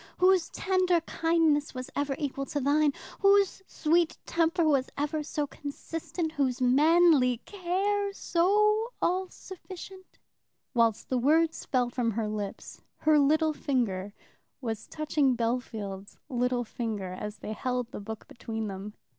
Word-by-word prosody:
Whose 365 -2 +4
tender 370 -2 +2
kindness 325 -3 +1
was 255 0 -6
ever 285 -1 -1
equal 275 -1 -3
to 290 - -2
thine? 290 +2 +3 0.3
whose 395 -1 +4
sweet 330 +1 +1
temper 335 0 +1
was 275 -4 +2
ever 295 +2 -1
so 295 0 -2
constant? 320 +3 -5
whose 275 -5 0
manly 280 0 +5
care 400 +2 -1
so 425 +5 +2
all 370 +1 0
sufficient?" 375 0 -11 0.6
While 230 -3 +4
the 255 - 0
words 320 +5 +2
fell 250 -3 +1
from 240 -2 0
her 220 0 -1
lips 210 -2 -6 0.2
her 305 -1 +4
little 310 +2 +3
finger 215 -10 -1 0.5
was 225 -4 -4
touching 295 -4 +1
Bellfield's 220 -5 -3
little 250 -1 0
finger, 215 -5 -4
as 210 +3 -6
they 215 - -6
held 250 +1 -2
the - - -6
book 220 +2 -7
between 225 -2 -5
them. 195 +2 -7
285 Hz, 135 wpm, -28 LUFS, 240-335 Hz, 0.6 s, manly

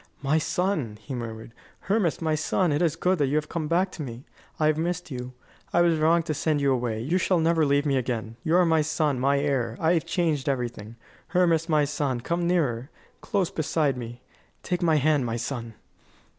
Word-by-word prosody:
"My 145 +3 +2
son!" 155 - -1
he 130 +5 -8
murmured; 115 -2 -6 0.3
"Hermas, 195 -5 0
my 160 -1 +1
son! 155 +3 +1
It 145 - +1
is 165 -4 +2
good 185 -1 +1
that 145 - +2
you 140 - -1
have 150 0 0
come 165 -2 -3
back 180 +4 +1
to 165 - -8
me. 125 -2 -7 0.3
I 155 - +2
have 155 0 +3
missed 175 +1 -3
you. 125 0 -6 0.4
I 175 - +4
was 170 -2 +3
wrong 165 +2 +3
to 155 - -2
send 150 0 0
you 140 -1 +2
away. 120 -3 -1
You 165 +10 0
shall 185 0 +2
never 165 -1 +2
leave 140 +1 +2
me 140 -2 +2
again. 115 -3 -3
You 160 - +2
are 180 0 +5
my 160 -1 +3
son, 150 -3 0
my 140 +2 +2
heir. 130 -5 -1
I 165 +1 +3
have 165 -5 0
changed 155 -6 0
everything. 120 -4 -3 0.3
Hermas, 170 -3 +2
my 150 -2 +3
son, 140 -3 -1
come 170 +7 -1
nearer 140 -8 0 0.3
close 195 -4 -1
beside 150 -3 0
me. 120 0 -8 0.4
Take 180 -1 -2
my 165 -2 +3
hand, 150 -1 +3
my 115 -1 -2
son!" 115 -1 -5
150 Hz, 210 wpm, -26 LUFS, 130-165 Hz, 0.4 s, are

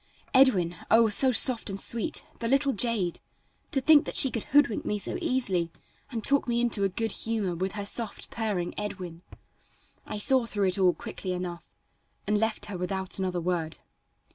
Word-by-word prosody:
"Edwin!" 195 -11 +4
Oh! 225 0 +5
so 260 +5 +4
soft 240 -1 +2
and 195 0 -5
sweet! 235 +2 0
The 230 - -2
little 275 +2 +2
jade! 210 -6 +1 0.5
to 275 - 0
think 295 +2 +5
that - - -5
she 265 - +7
could 230 - -4
hoodwink 285 -6 +2
me 210 - -2
so 205 - -5
easily, 190 -10 -1 0.4
and 230 -4 -5
talk 280 +2 +2
me 235 0 0
into 235 -4 +2
a 195 - +2
good 225 +3 -3
humor 215 -5 -2
with 185 +3 -3
her 205 -1 -5
soft, 220 +1 -1
purring 205 -6 -2
"Edwin." 180 -5 -6 0.9
I - - -5
saw 255 +2 +3
through 205 -3 0
it 185 - 0
all 180 -2 +4
quickly 210 -5 -6
enough, 180 -1 -6 0.6
and 210 +1 +1
left 220 -1 -1
her 200 -4 -6
without 190 +1 -3
another 185 -2 -2
word. 170 -2 -2
210 Hz, 180 wpm, -27 LUFS, 185-235 Hz, 0.9 s, she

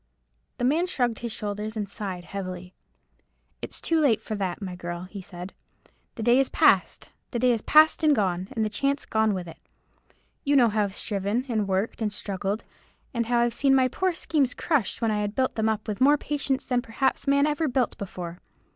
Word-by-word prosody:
The 245 - -1
man 320 +7 +2
shrugged 245 -9 0
his 235 -1 -4
shoulders, 210 +1 -4
and 205 -2 -2
sighed 190 -3 -5
heavily. 185 -1 -6 0.9
"It's - - -3
too 330 -1 +1
late 265 -8 +3
for - - -6
that, 190 -4 -2
my 185 -3 -5
girl," 175 0 -5
he 190 +2 -8
said; 180 0 -9 0.6
"the 225 - -5
day 240 +3 +5
is 270 - +2
past—the 240 - +1
day 250 +1 +3
is 230 -2 0
past 310 +2 +5
and 305 -2 +5
gone—and 190 +2 -1
the - - -1
chance 280 +6 -1
gone 220 -2 +1
with 180 -2 -5
it. 165 - -11 0.8
You 285 -1 +2
know 245 -4 +6
how 210 -1 +1
I've 195 -1 -6
striven, 205 +4 -1
and 215 -5 0
worked, 195 +5 -1
and 215 -1 0
struggled; 200 +1 -3 0.5
and 235 -2 -1
how 240 0 +2
I've 235 0 +1
seen 275 -1 +3
my 260 -1 +4
poor 370 +7 0
schemes 290 -6 0
crushed 275 - 0
when 225 - +2
I 210 -1 0
had 205 0 -3
built 260 -1 +1
them 220 0 +1
up 215 0 -2
with 210 +2 -4
more 290 +3 +6
patience 280 -2 -2
than 250 -1 +1
perhaps 260 +4 -1
man 280 +1 +4
ever 300 +1 0
built 255 -3 0
before. 180 -3 -6
220 Hz, 200 wpm, -26 LUFS, 200-265 Hz, 0.9 s, know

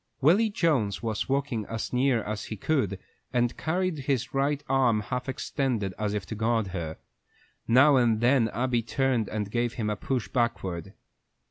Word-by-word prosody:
Willy 185 - +4
Jones 140 - 0
was 110 +1 -2
walking 135 -5 0
as 115 +1 -4
near 125 -3 +2
as 105 0 -4
he 110 - -6
could, 105 - 0 0.3
and 120 -1 +2
he - - -16
carried 180 0 -1
his 130 -2 -1
right 140 +1 0
arm 125 -5 +3
half 125 +4 -4
extended, 125 -7 -2
as 105 -1 -1
if 100 -3 -3
to 95 - -6
guard 110 -1 0
her. 85 -4 -4 0.7
Now 130 +4 +6
and 115 -3 +3
then 120 0 +4
Abby 120 +2 0
turned 125 -1 0
and 105 -2 -3
gave 120 0 0
him 105 -3 -2
a - - -1
push 125 +3 -2
backward. 95 -8 -2
120 Hz, 170 wpm, -27 LUFS, 110-135 Hz, 0.7 s, Now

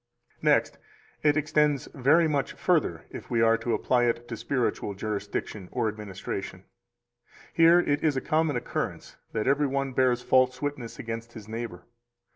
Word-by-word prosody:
262 - - +5 0.3
Next, 150 - -4
it 145 - +2
extends 150 -2 +1
very 150 +6 +4
much 145 -4 -1
further, - - 0
if - - -9
we 115 - +1
are 115 0 +5
to 115 +1 -1
apply 125 -1 +2
it 120 0 -1
to 115 - -5
spiritual 115 -3 -2
jurisdiction 100 -1 -4
or 120 -3 0
administration; 100 -3 -5 0.9
here 165 +1 +6
it 145 -4 0
is 150 -4 +2
a - - +3
common 155 +2 +1
occurrence - - -4 0.2
that 110 - -1
every 140 +2 +3
one 135 0 -2
bears 125 -1 +2
false 130 0 +3
witness 145 -5 -4
against 115 0 -6
his 110 -2 -10
neighbor. 110 -6 -6
125 Hz, 160 wpm, -27 LUFS, 115-145 Hz, 0.9 s, here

